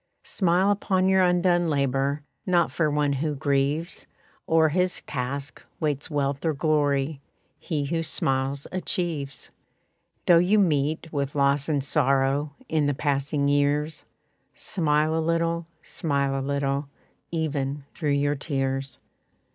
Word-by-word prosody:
Smile 185 +1 +2
upon 190 -2 +1
your 190 0 +4
undone 175 -1 +3
labor; 140 0 0 0.2
Not 175 -2 +3
for 155 -3 +1
one 145 -1 +1
who 150 +2 -1
grieves 140 +5 -1 0.4
O'er 160 -1 +5
his 180 +3 0
task, 135 0 -5 0.2
waits 150 0 -1
wealth 140 -2 -1
or 160 -3 +1
glory; 145 -1 +1 0.4
He 150 -5 -2
who 165 +3 -1
smiles 135 -3 -1
achieves. 170 -6 -3 0.7
Though 170 -2 +7
you 185 +5 +3
meet 155 -3 +1
with 140 -1 -2
loss 140 +1 +2
and 145 -3 +1
sorrow 140 +2 +1
In 155 -2 +1
the 145 - 0
passing 140 0 0
years, 145 +2 +1 0.5
Smile 155 -4 0
a 160 - +1
little, 165 0 0 0.2
smile 140 -3 -1
a 135 - -1
little, 140 0 -1 0.4
Even 145 -4 -2
through 150 - -2
your 145 +1 +1
tears. 135 -2 -2
145 Hz, 130 wpm, -25 LUFS, 140-165 Hz, 0.7 s, Though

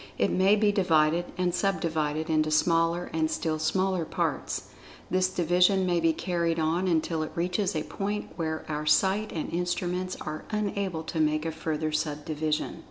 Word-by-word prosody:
It - - +2
may 190 +3 +4
be 210 -1 +3
divided, 170 -3 +3
and 180 -1 +1
sub 195 +2 +1
divided, 155 -2 -1
into 155 -1 +2
smaller 165 +2 +2
and 160 -1 +1
still 155 -1 -1
smaller 185 +3 +1
parts. - - -2 0.4
This 185 0 +2
division 180 +2 +3
may 175 -1 +2
be 165 0 +3
carried 170 0 -1
on 165 +4 +1
until 165 -1 +1
it 155 - -4
reaches 180 +2 0
a 155 - -1
point 205 +1 -4
where 160 -2 -3
our 150 0 -3
sight 195 +6 +3
and 160 - -4
instruments 180 +1 -2
are 155 0 -5
unable 200 -5 -2
to 160 0 -4
make 155 0 +1
a 165 - -1
further 155 -1 -2
sub 150 -1 -2
division. 155 0 -2
165 Hz, 170 wpm, -28 LUFS, 155-185 Hz, 0.4 s, may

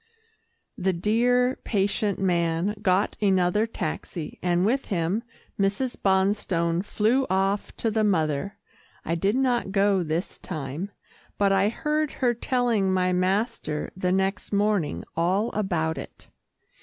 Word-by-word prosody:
The 190 0 +1
dear, 245 +7 +2
patient 200 -1 0
man 170 +1 +1
got 190 0 +2
another 195 +2 +2
taxi, 175 -6 -5
and 175 0 +2
with 265 +6 +1
him, 185 +2 -1 0.4
Mrs. 200 +6 0
Bonstone 190 -3 +1
flew 230 +6 +1
off 195 +2 0
to 225 - 0
the 215 0 +1
mother. 160 -2 0 0.5
I 165 - -1
did 195 +6 +1
not 250 -6 +1
go 195 -1 +3
this 165 +2 -3
time, 155 +3 -5 0.5
but 200 -1 +3
I 195 +1 +3
heard 300 +4 -1
her 245 -2 +1
telling 235 -5 +1
my 185 -1 +2
master 185 -3 -1
the 180 -1 0
next 190 0 0
morning 200 - +1
all 185 +7 +1
about 165 -6 -1
it. - - -11
195 Hz, 130 wpm, -25 LUFS, 180-215 Hz, 0.5 s, go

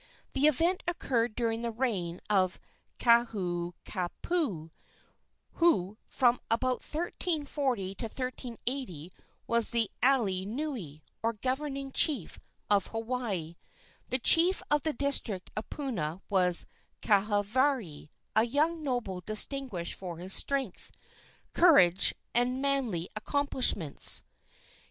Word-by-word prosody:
The 280 +2 +4
event 335 +5 +1
occurred 240 -9 -1
during 230 -1 -2
the 235 - -3
reign 210 -8 -3
of 190 -3 +1 0.4
Kahoukapu, 185 - -1 0.8
who 215 - +1
from 245 -2 +2
about 250 +2 +1
1340 290 - -3
to 215 - -6
1380 240 - -5 0.3
was 235 -1 +3
the 230 -3 0
alii 205 -8 +2
nui, 220 - -6 0.2
or 230 +1 -1
governing 270 +4 -4
chief, 265 - +1 0.3
of 200 -2 +2
Hawaii. 225 -8 -4 0.5
The 255 - 0
chief 345 +9 +6
of 295 0 +3
the 310 +1 -1
district 240 -8 +1
of 215 - -6
Puna 190 - -4
was 180 -3 +6 0.4
Kahavari, 205 - 0 0.3
a 220 - +4
young 310 +6 +1
noble 245 -10 -3
distinguished 215 -3 +2
for 180 -3 -7
his 185 +3 -3
strength, 270 -8 -1 0.6
courage 195 - +5 0.2
and 245 +2 0
manly 265 -11 0
accomplishments. 245 - +2
235 Hz, 105 wpm, -29 LUFS, 190-275 Hz, 0.8 s, chief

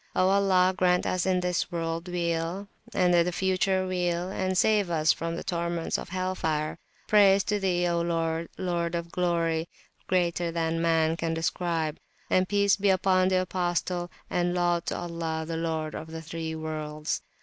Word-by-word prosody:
O 185 0 +3
Allah, 190 -2 +4
grant 180 -1 +2
us 185 0 0
in 185 -1 +2
this 180 +1 -1
World 165 0 -3
Weal, 170 +2 -2 0.2
and 180 -1 +2
in 170 -1 +5
the 180 - -1
future 185 +1 +1
Weal, 180 -1 -1
and 185 -1 -1
save 210 -2 +3
us 160 -2 +3
from 165 0 -4
the - - -5
torments 170 -1 -2
of - - -8
Hell 185 +1 -2
fire! 155 -4 -2 0.3
Praise 200 -2 +5
to 210 +1 0
Thee, 180 -2 +1
O 170 -1 +1
Lord, 165 -1 -1
Lord 175 -2 -1
of 170 0 -4
Glory, 170 -2 0 0.4
greater 175 -2 +1
than 165 0 -1
Man 165 -1 +2
can 165 -1 -1
describe! 165 -1 -1 0.3
and 185 0 +3
Peace 200 -1 +3
be 200 0 +2
upon 185 -1 +3
the 185 -1 +2
Apostle, 175 -1 -1 0.2
and 175 0 0
Laud 175 -1 +1
to - - -1
Allah, 165 -2 -3
the 165 - -3
Lord 160 -1 -2
of 155 - -6
the 160 0 -7
(three) 160 0 -5
Worlds. 155 -1 -3
175 Hz, 175 wpm, -27 LUFS, 165-185 Hz, 0.4 s, in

